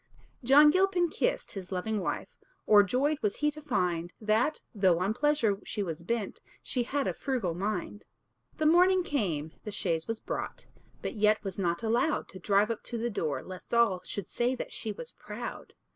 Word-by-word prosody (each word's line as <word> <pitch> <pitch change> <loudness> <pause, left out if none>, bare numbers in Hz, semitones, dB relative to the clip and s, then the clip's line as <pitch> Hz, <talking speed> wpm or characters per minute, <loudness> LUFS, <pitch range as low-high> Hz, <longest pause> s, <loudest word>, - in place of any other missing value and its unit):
John 290 +4 +7
Gilpin 370 -1 +3
kissed - - -1
his 190 -2 -7
loving 205 +4 -1
wife; 185 - -2 0.4
O'er 210 -1 +8
joyed 270 +9 +1
was 210 -2 0
he 295 0 +1
to 305 +1 -10
find, 180 - -1
That, 220 +7 +1
though 190 -5 +3
on 190 +4 0
pleasure 245 -7 +2
she 205 - -3
was 165 -3 -5
bent, 215 +3 -3 0.2
She 250 - -1
had 275 +3 -1
a - - 0
frugal 245 -11 -2
mind. 205 +2 -3 0.5
The 310 - 0
morning 360 +3 +5
came, 175 - -1
the - - -5
chaise 170 -5 -1
was 225 -1 -3
brought, - - -5 0.4
But - - -3
yet 215 -1 +3
was 195 -1 -5
not 170 -1 0
allowed 235 +7 +1
To 185 - -10
drive 200 +4 +2
up 225 - -4
to 235 - -3
the 235 +1 -2
door, 150 -9 -2
lest 185 +5 -6
all 225 -6 +3
Should 200 -1 -5
say 245 +2 0
that - - -6
she 220 - -4
was 475 - -7
proud. - - -8
215 Hz, 190 wpm, -30 LUFS, 185-275 Hz, 0.5 s, O'er